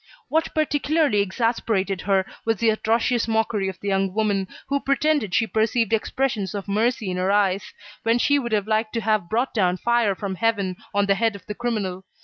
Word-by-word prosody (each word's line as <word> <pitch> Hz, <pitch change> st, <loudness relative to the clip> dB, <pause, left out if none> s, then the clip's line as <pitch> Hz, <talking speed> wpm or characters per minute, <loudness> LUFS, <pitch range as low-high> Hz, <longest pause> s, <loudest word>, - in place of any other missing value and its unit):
What 320 Hz, +1 st, +1 dB
particularly 300 Hz, -5 st, +2 dB
exasperated 200 Hz, -2 st, -1 dB
her 195 Hz, -1 st, +1 dB, 0.2 s
was 225 Hz, -1 st, 0 dB
the 230 Hz, +1 st, +3 dB
atrocious 230 Hz, +2 st, +1 dB
mockery 220 Hz, -3 st, 0 dB
of 185 Hz, -, -8 dB
the 205 Hz, -, -3 dB
young 195 Hz, -1 st, 0 dB
woman, 205 Hz, -3 st, +1 dB, 0.2 s
who 280 Hz, 0 st, 0 dB
pretended 275 Hz, -7 st, +1 dB
she 225 Hz, -, +3 dB
perceived 225 Hz, 0 st, 0 dB
expressions 220 Hz, -3 st, -1 dB
of 200 Hz, 0 st, -5 dB
mercy 215 Hz, 0 st, 0 dB
in 180 Hz, -, -3 dB
her 185 Hz, +2 st, +1 dB
eyes, 200 Hz, -1 st, +1 dB, 0.3 s
when 230 Hz, +1 st, +2 dB
she 285 Hz, +4 st, +3 dB
would 240 Hz, -3 st, -4 dB
have 210 Hz, -2 st, +1 dB
liked 215 Hz, 0 st, 0 dB
to 230 Hz, -, -1 dB
have 215 Hz, -5 st, 0 dB
brought 240 Hz, +4 st, 0 dB
down 185 Hz, -4 st, +2 dB
fire 235 Hz, -2 st, +1 dB
from 195 Hz, 0 st, -4 dB
heaven 200 Hz, -3 st, 0 dB
on 205 Hz, 0 st, +2 dB
the 200 Hz, -, +3 dB
head 225 Hz, +1 st, 0 dB
of 200 Hz, -, -12 dB
the 210 Hz, -, -5 dB
criminal. 205 Hz, -5 st, -3 dB
215 Hz, 195 wpm, -23 LUFS, 195-235 Hz, 0.3 s, the